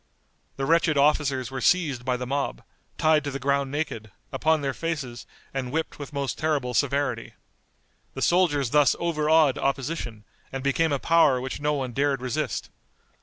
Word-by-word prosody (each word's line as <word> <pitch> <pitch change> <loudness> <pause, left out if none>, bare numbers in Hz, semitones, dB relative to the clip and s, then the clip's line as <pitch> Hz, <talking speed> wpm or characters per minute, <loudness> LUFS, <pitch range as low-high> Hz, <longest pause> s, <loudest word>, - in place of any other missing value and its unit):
The 135 - -2
wretched 165 -1 +3
officers 140 -4 +2
were 130 - -4
seized 150 -9 +2
by 125 0 0
the 125 - -4
mob, 135 - -2 0.3
tied 155 -1 +3
to 145 - -3
the 135 - -4
ground 140 0 0
naked, 135 -7 -4 0.2
upon 160 -1 +1
their 135 -1 -1
faces, 140 -8 -4 0.3
and 130 -2 -3
whipped 160 +1 -3
with 145 - -7
most 140 -6 -3
terrible 145 -5 0
severity. 140 -2 0 0.8
The - - -2
soldiers 145 -8 +2
thus 145 -3 +4
overawed 155 -3 +3
opposition, 135 -5 -2 0.3
and 135 -1 -5
became 150 +4 +1
a 140 - +2
power 150 -3 +4
which 130 +2 -5
no 150 0 +1
one 135 -4 -2
dared 140 +2 +1
resist. 125 -1 -3
140 Hz, 165 wpm, -25 LUFS, 130-155 Hz, 0.8 s, thus